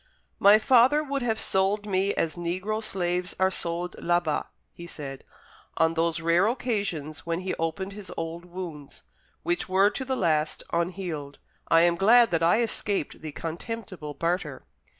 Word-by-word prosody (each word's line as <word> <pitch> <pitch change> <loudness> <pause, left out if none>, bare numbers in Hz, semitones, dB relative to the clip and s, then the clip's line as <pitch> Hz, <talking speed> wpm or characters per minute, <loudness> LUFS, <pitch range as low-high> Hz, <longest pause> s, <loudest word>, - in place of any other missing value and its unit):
"My 200 +2 +8
father 255 +6 +4
would 280 -2 -2
have 225 -2 0
sold 195 +2 +1
me 195 0 +1
as 160 - 0
negro 185 +6 -2
slaves 180 -2 -1
are 190 0 +3
sold 175 0 -3
là 175 0 +2
bas," 160 -4 -2 0.3
he 170 - -10
said, 135 -5 -7 0.5
on 160 0 +3
those 165 0 0
rare 170 +4 +3
occasions 200 - -2
when 170 +1 -1
he 185 - -2
opened 190 +4 -2
his 205 -2 -9
old 165 +1 -4
wounds, 175 -5 -8 0.4
which 345 - -1
were 195 +2 +4
to 265 - -4
the 260 0 -2
last 155 -6 0
unhealed: 170 -4 -3 0.3
"I 165 - +5
am 170 0 +3
glad 230 +5 +6
that 165 -1 +1
I 175 +8 +4
escaped 205 -6 -2
the 155 -1 -6
contemptible 170 -1 -6
barter." 165 -5 -2
180 Hz, 160 wpm, -26 LUFS, 165-205 Hz, 0.5 s, My